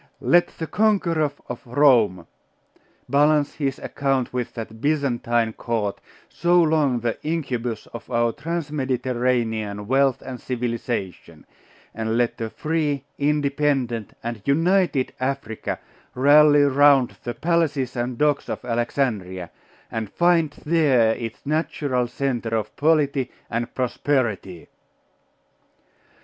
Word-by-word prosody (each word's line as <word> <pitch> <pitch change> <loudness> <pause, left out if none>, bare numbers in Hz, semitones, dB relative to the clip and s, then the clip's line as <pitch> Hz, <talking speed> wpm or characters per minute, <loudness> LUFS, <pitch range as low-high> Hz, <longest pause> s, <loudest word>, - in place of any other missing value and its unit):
Let 175 0 +4
the 165 - -3
conqueror 170 -6 +1 0.2
of 125 - -6
Rome 120 - +3 0.8
balance 145 +1 +3
his 135 -3 -2
account 135 -3 -1
with 125 -2 -3
that 110 -1 -7
Byzantine 120 -6 0
court, 110 -4 -3 0.3
so 175 +1 +2
long 155 -7 +2
the 115 -1 -2
incubus 125 -8 -3
of 115 - -9
our 115 0 +2
Trans 165 +3 -4
Mediterranean 120 -6 -1
wealth 135 +1 +2
and 125 -2 -7
civilisation; 115 -9 -4 0.5
and 110 +1 -2
let 120 -1 0
a 115 - -2
free, 150 -1 -1 0.2
independent, 140 -5 0
and 115 -2 -4
united 165 - +2
Africa 130 -4 -3 0.4
rally 145 +2 +6
round 140 -2 +4
the 120 -1 -4
palaces 145 -3 0
and 120 0 -2
docks 150 0 +1
of - - -5
Alexandria, 115 -7 -2 0.4
and 110 -3 -3
find 170 -2 +3 0.2
there 140 -8 +3
its 115 -1 -7
natural 145 -4 -1
centre 120 -3 -2
of 105 -1 -5
polity 145 -4 +2 0.2
and 115 +1 0
of - - -27
prosperity. 120 - -1
130 Hz, 115 wpm, -23 LUFS, 115-150 Hz, 0.8 s, rally